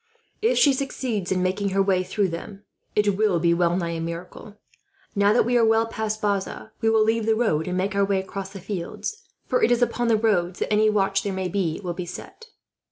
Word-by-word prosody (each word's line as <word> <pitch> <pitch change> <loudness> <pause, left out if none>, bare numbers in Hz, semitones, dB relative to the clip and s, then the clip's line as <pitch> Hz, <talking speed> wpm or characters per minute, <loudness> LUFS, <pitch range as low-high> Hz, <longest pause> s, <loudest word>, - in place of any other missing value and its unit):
If 455 +3 +2
she 285 - +5
succeeds 255 -8 -3
in 185 -1 +1
making 195 +2 0
her 195 +1 +1
way 190 -2 +2
through 195 +1 0
them, 195 +4 -7 0.3
it 210 -2 +2
will 205 -4 +2
be 170 +1 +3
well 175 0 +2
nigh 170 -2 -2
a - - -4
miracle. 170 +5 -7 0.6
"Now 200 0 +3
that 225 - +3
we 245 0 +2
are - - +4
well 225 0 +4
past 220 -1 -3
Bazas, 200 +1 -2
we 225 - +3
will 220 -1 +4
leave 225 0 +1
the 220 - +4
road 200 -9 0
and 180 0 -2
make 195 +2 -1
our 200 - +3
way 195 -1 +1
across 195 0 -6
the 195 0 -9
fields; 205 - -5 0.2
for - - 0
it - - +4
is 245 0 +3
upon 240 0 0
the 225 -1 +4
roads 190 -5 +1
that - - -1
any 215 +1 +4
watch 195 -2 +1
there 200 - -3
may 190 -1 -2
be 175 -4 -1
will 175 -1 -3
be 175 0 -6
set." 450 - -10
200 Hz, 230 wpm, -24 LUFS, 185-220 Hz, 0.6 s, she